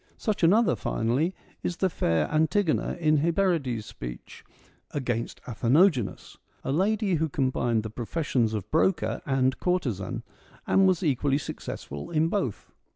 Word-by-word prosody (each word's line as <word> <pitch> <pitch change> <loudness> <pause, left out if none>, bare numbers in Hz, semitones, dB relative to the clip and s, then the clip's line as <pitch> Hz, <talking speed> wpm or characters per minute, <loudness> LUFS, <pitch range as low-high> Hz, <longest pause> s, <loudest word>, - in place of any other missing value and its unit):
Such 215 -3 -2
another, 195 - +4
finally, 125 - 0 0.3
is 175 - -3
the 190 - +2
fair 80 - 0
Antigona 160 +4 +1
in 155 -2 +3
Hyperides' 160 - +1
speech - - -9 0.3
' - - -35
Against 120 -3 -3
Atheno 130 - +4
genas,' 110 - -6 0.3
a - - -2
lady 200 +5 +1
who 160 +1 0
combined 130 -5 0
the 110 - -6
professions 120 -2 -1
of 105 -1 -5
broker 165 +2 +1
and 130 -1 +1
courtesan, 130 - -1 0.4
and 195 0 +4
was 185 -1 +2
equally 140 -2 +2
successful 70 - -6
in 160 0 +2
both. 180 - -2
145 Hz, 140 wpm, -27 LUFS, 115-175 Hz, 0.4 s, another